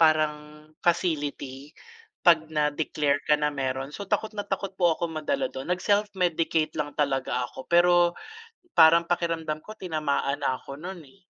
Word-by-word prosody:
parang 150 -1 +1 0.2
facility, 145 -5 -1 0.6
'pag 160 -3 +5
na-declare 150 -1 0
ka 150 - +6
na 150 0 0
meron 135 0 -3
So, 200 +4 -7
takot 220 +2 0
na 210 - -4
takot 195 0 -2
po 170 -2 +4
ako 170 -1 -3
madala 260 - -2
do'n, 130 +4 -7
nag 180 0 +1
self-medicate 180 -6 +1
lang 150 -2 -4
talaga 135 -3 0
ako 130 - -11
pero, 175 +1 +5 0.9
parang 165 +1 +7
pakiramdam 165 -3 -1
ko 215 +7 -10
tinamaan 150 -6 -1
na 135 -2 0
ako 140 - -9
no'n, 175 +2 -7
eh. 145 +8 -20
155 Hz, 155 wpm, -26 LUFS, 145-175 Hz, 0.9 s, parang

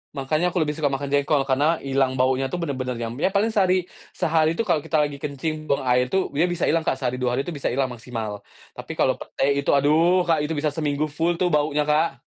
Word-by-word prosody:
Makannya 155 +5 0
aku 175 - +2
lebih 150 - -1
suka 150 -1 -1
makan 140 0 -3
jengkol, 140 0 +2
karena 145 +5 +1
hilang 135 -1 +1
baunya 130 +1 +1
tuh 130 - -4
bener-bener 130 -5 -3
yang 115 -1 -4
ya - - +2
paling 200 +4 +1
sehari 185 -3 +2 0.3
sehari 160 0 +2
tuh 230 - 0
kalau 175 -7 +1
kita 150 +1 +1
lagi 145 -1 -4
kencing 155 +2 -4
buang 140 - 0
air 125 0 +2
tuh, 190 +8 -1
dia 155 +5 +1
bisa 175 -1 -3
ilang 165 - +3
Kak, - - +2
sehari 125 -1 -3
2 125 -1 0
hari 135 - 0
itu 175 - -5
bisa 145 -4 -3
hilang 130 +1 0
maksimal. 115 -3 -6 0.3
Tapi - - -8
kalau - - +1
pete - - -5 0.2
itu 140 - -3
aduh 160 +6 +3
Kak 165 -3 +2
itu 160 - -3
bisa 150 0 0
seminggu 150 0 -2
full 165 +3 0
tuh 180 0 0
baunya 150 0 +1
Kak. 150 -2 +1
145 Hz, 235 wpm, -23 LUFS, 135-165 Hz, 0.3 s, ilang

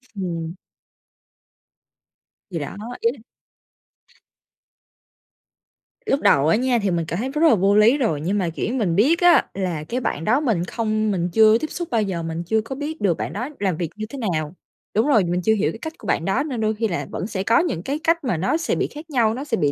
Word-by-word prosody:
Ừm. 170 -3 -4 2.0
Thì 165 - -3
đó, 145 - -6 0.3
ý 230 - +3
là 270 - -15 2.9
Lúc 280 - +1
đầu 140 +1 +4
á 165 - +4
nha 245 0 +1
thì 200 -3 0
mình 170 -2 0
cảm 170 +3 -3
thấy 255 +4 -2
rất 300 +3 -3
là - - +5
vô 195 +1 +3
lý 220 +6 +5
rồi, 165 - 0
nhưng 195 +6 0
mà, 180 -4 0
kiểu, 195 +7 -3
mình 200 -10 0
biết 280 - +4
á 350 -1 +6
là 180 -6 -3
cái 245 +10 -3
bạn 165 - -3
đó 250 +6 +3
mình 225 - 0
không 215 0 -1
mình 175 -2 -1
chưa 220 0 +6
tiếp 310 - -3
xúc 345 -2 -5
bao 230 -2 +2
giờ, 185 -5 -2
mình 165 +1 -4
chưa 220 +5 +1
có 245 +5 -7
biết 300 +3 -5
được 185 -5 +2
bạn - - -4
đó 245 +8 -4
làm 190 -5 0
việc 170 -3 -2
như 215 0 -4
thế 280 - -7 0.2
nào. 155 0 -2 0.4
Đúng 220 +6 +3
rồi, 225 -9 +4
mình 175 +1 -1
chưa 220 +4 +3
hiểu 215 -1 +1
cái 225 - -10
cách 320 +4 -6
của - - -11
bạn 165 - 0
đó 195 +8 +1
nên 255 -7 -4
đôi 215 0 +1
khi 225 +1 0
là 175 - -3
vẫn 190 - -4
sẽ 190 -4 -3
có 230 +3 +4
những 185 - -1
cái 285 +3 -2
cách 335 0 +2
mà 240 - 0
nó 195 - +1
sẽ 335 - -1
bị - - 0
khác 310 +2 -11
nhau, 230 -6 +2
nó 265 +4 -5
sẽ 260 -6 -1
bị 145 -5 +1
215 Hz, 235 wpm, -22 LUFS, 175-255 Hz, 2.9 s, á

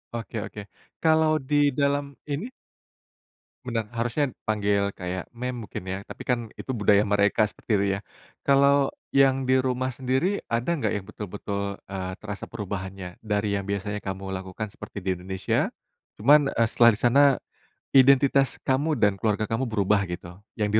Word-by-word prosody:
Oke 115 -1 -5
oke 105 - -8 0.4
kalau 160 -1 +4 0.2
di 150 - +2 0.2
dalam 140 0 +1 0.3
ini 150 - -2 1.2
Bener 115 -4 -2
harusnya 120 +5 0 0.2
panggil 100 -2 +1
kayak 90 0 -4
ma'am 125 -1 -4
mungkin 95 - -7
ya 95 - -2
tapi - - -10
kan 125 -1 +3 0.2
itu 130 - -4
budaya 105 -1 +4
mereka 100 0 +2
seperti - - -9
itu 100 - +1
ya, - - -7 0.5
kalau 140 0 +4 0.2
yang 135 -1 +3
di 130 - +5
rumah 130 0 0
sendiri 130 +10 -1
ada 115 +4 -1
nggak 140 - 0
yang 105 -2 -3
betul-betul, 100 -1 -5
eee, 95 -1 -4
terasa 100 -2 -6
perubahannya? 95 -4 -6
Dari 105 -1 0
yang 100 - -4
biasanya 100 +1 -2
kamu 95 0 -5
lakukan 95 +2 -5
seperti 100 - -11
di 95 - -3
Indonesia, 95 +1 -1 0.5
cuman, 140 +5 +5
eee, 115 0 +3
setelah 115 +1 +6
di 105 - -6
sana, 125 +4 +5 0.7
identitas 135 0 +5
kamu 145 +3 +1
dan 105 -2 +3
keluarga 105 +1 0
kamu 115 +4 -1
berubah 100 -1 +2
gitu? 85 +1 -7 0.2
Yang 105 - +1
110 Hz, 155 wpm, -26 LUFS, 100-130 Hz, 1.2 s, setelah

